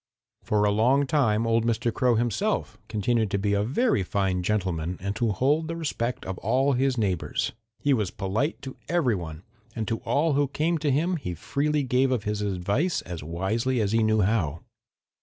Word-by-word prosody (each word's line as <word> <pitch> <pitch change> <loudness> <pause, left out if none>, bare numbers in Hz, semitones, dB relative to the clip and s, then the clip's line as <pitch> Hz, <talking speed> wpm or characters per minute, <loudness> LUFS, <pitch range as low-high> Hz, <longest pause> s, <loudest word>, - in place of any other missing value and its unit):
"For 105 -1 +1
a 105 - +3
long 125 +7 +3
time 120 -6 +2
old 115 0 +2
Mr. 115 0 0
Crow 125 -2 +2
himself 115 -1 -1
continued 110 +1 0
to 100 - 0
be 100 +1 0
a 100 - +2
very 135 - +1
fine 95 -1 0
gentleman 90 -3 -1
and 100 +2 -3
to 115 -2 +1
hold 145 +9 +1
the 165 - -3
respect 125 -7 -3
of 95 -1 -5
all 130 +6 +2
his 130 0 +1
neighbors. 95 -6 -1 0.3
He 145 - +2
was 105 -7 0
polite 110 - -2
to 135 -1 -7
every 165 -8 +2
one, 80 -3 -6 0.3
and 110 -2 -3
to 115 - 0
all 155 +1 +1
who 145 0 +2
came 160 +4 0
to 150 - 0
him 165 +6 +1
he 90 - -5
freely 145 - 0
gave 130 +1 +2
of 120 -5 0
his 105 -1 -2
advice 100 - 0
as 85 -4 -7
wisely 110 - -1
as 105 -2 +1
he 115 0 +3
knew 110 -1 +3
how. 90 -7 0
115 Hz, 195 wpm, -26 LUFS, 100-135 Hz, 0.3 s, a